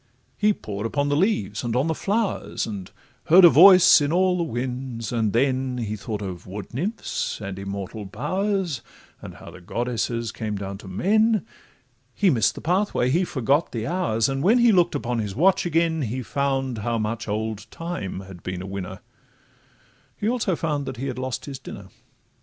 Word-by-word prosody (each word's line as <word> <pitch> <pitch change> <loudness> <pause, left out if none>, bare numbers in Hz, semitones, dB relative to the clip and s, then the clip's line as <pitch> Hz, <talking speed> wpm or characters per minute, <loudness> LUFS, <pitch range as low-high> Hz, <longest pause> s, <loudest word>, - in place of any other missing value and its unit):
He 210 0 +3
pored 105 - -4
upon 145 +4 -1
the 145 - +2
leaves, 145 - 0
and 120 -1 -2
on 130 +3 +2
the 165 - 0
flowers, 205 +5 -1
And 100 -4 -6 0.4
heard 180 +3 +8
a - - +10
voice 185 +2 +8
in 145 +1 0
all 185 +1 +3
the 175 - 0
winds; 125 -3 -4
and 110 -3 0
then 130 +1 +1
He 110 -3 -3
thought 105 0 -5
of 90 -2 -7
wood 100 +4 -8
nymphs 190 - -3
and 95 -2 -6
immortal 100 +1 -5
bowers, 185 - -2 0.4
And - - -9
how - - -11
the 90 - -13
goddesses 115 +2 -2
came 110 -3 -4
down 100 -1 -5
to 100 - -11
men: 215 - +2 0.7
He 195 -3 +3
miss'd 115 -5 +2
the - - -8
pathway, 180 -7 +1
he 170 +6 +2
forgot 140 -1 0
the 115 -2 -3
hours, 140 -9 0
And 135 0 -2
when 215 - +4
he 240 -1 +5
look'd 175 -5 +3
upon 120 -4 -2
his 105 -3 -3
watch 180 +6 +3
again, 165 -1 +1
He 125 +1 -3
found 135 +1 -1
how 115 +3 -1
much 110 +1 -3
old 110 0 -3
Time 165 - -5
had 95 -3 -11
been 90 0 -5
a - - -6
winner— 95 -1 -6 1.2
He 210 - -2
also 225 -6 +1
found 150 -4 -2
that 130 - -5
he 130 - -4
had 130 -2 -4
lost 130 -1 -4
his 135 -2 -7
dinner. - - -10
130 Hz, 185 wpm, -24 LUFS, 110-170 Hz, 1.2 s, a